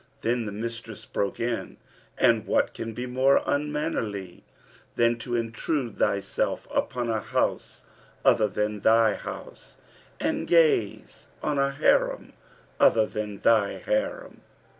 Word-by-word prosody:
Then 115 -1 0
the - - -4
mistress 115 0 -6
broke 100 - -2
in, 115 0 -3 0.4
'And - - +3
what - - +1
can 115 0 -5
be 125 - -4
more 130 +2 +3
unmannerly 145 - -2 0.5
than 120 0 +2
to 120 +2 -3
intrude 115 +2 -2
thyself 100 0 0
upon 120 -1 -1
a 110 - 0
house - - -2 0.4
other 110 - +5
than 105 +1 -2
thy 110 +1 +4
house - - -9 0.4
and - - -1
gaze 155 - +2 0.2
on 150 -2 0
a 140 0 +3
Harim 140 - +1 0.5
other 110 -1 +5
than 105 -2 -5
thy 110 -3 +3
Harim?' - - -3
115 Hz, 125 wpm, -26 LUFS, 105-135 Hz, 0.5 s, other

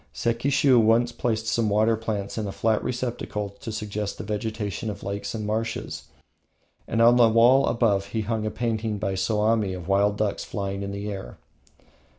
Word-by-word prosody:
Sekishiu 130 +2 +3
once 115 +2 +3
placed 110 -2 -2
some 110 -1 +1
water 110 +2 +3
plants 105 -3 -4
in 110 -2 -2
a - - -3
flat 110 +2 0
receptacle 120 -4 -3
to 115 - -6
suggest 105 -1 -4
the - - -6
vegetation 110 +1 -3
of 100 -1 -7
lakes 100 +3 -4
and 110 -1 -4
marshes, 110 +2 -3 0.8
and 115 0 +2
on 120 +1 +6
the 120 -2 +6
wall 120 +5 +5
above 105 -5 +1
he 110 +2 -2
hung 110 0 -2
a 110 - -1
painting 110 -2 -2
by 100 -1 -2
Soami 105 -1 +1
of 90 -2 -9
wild 100 +1 +2
ducks 105 -2 -1
flying 100 -2 -4
in 100 0 -4
the 100 +1 -4
air. 95 -11 -7
110 Hz, 175 wpm, -25 LUFS, 100-115 Hz, 0.8 s, on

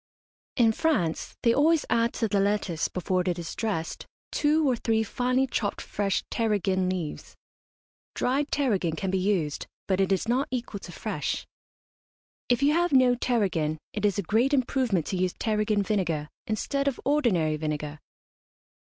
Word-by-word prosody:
In 230 -3 +4
France 220 - 0
they 230 - +5
always 310 +4 +3
add 230 0 +2
to 225 - 0
the 205 -1 +1
lettuce, 195 -5 0
before 185 0 -1
it 180 -1 -1
is 170 -2 -5
dressed, 200 -8 -3 0.2
two 305 0 +2
or 255 - +3
three 225 -1 +1
finely 250 +4 +1
chopped 225 -5 -2
fresh 200 -1 -1
tarragon 200 -5 +1
leaves. 180 -5 -4 0.8
Dried 280 +3 0
tarragon 205 - +1
can 190 +3 -2
be 190 - +1
used, 180 -7 0 0.2
but 190 0 +1
it 195 - +1
is 195 +3 +1
not 255 +4 +1
equal 240 -5 -4
to - - -10
fresh. - - -3 1.0
If 245 +2 +2
you 290 +1 +4
have 345 +2 +2
no 255 -2 +5
tarragon 195 -11 0 0.2
it 210 - -4
is 205 -2 +2
a 200 - 0
great 235 - +2
improvement 245 - +1
to 190 - -2
use 180 -1 0
tarragon 215 -1 0
vinegar 170 -8 -1 0.2
instead 275 +6 -1
of 275 - 0
ordinary 200 - +2
vinegar. 150 -1 -4
210 Hz, 160 wpm, -27 LUFS, 185-250 Hz, 1.0 s, they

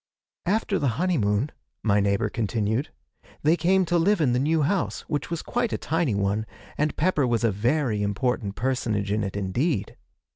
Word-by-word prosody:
'After 205 0 +1
the 140 - +1
honeymoon,' 140 - +1 0.3
my 105 -2 +3
neighbour 100 0 +1
continued, 110 +3 -1 0.5
'they 155 +3 +5
came 185 +3 +3
to 175 0 +2
live 200 +4 +3
in 135 -6 +2
the 125 - +2
new 155 +3 +2
house, 185 +5 0
which 145 - -3
was 170 -2 -3
quite 240 -2 -1
a - - -1
tiny 160 -8 0
one, 100 +2 0 0.3
and 150 +1 -1
Pepper 150 -5 +2
was 120 -1 +1
a 115 - +3
very 115 +2 0
important 105 0 -1
personage 110 -5 -1
in 105 +1 +1
it 95 0 -3
indeed. 100 - -1
125 Hz, 175 wpm, -25 LUFS, 105-165 Hz, 0.5 s, they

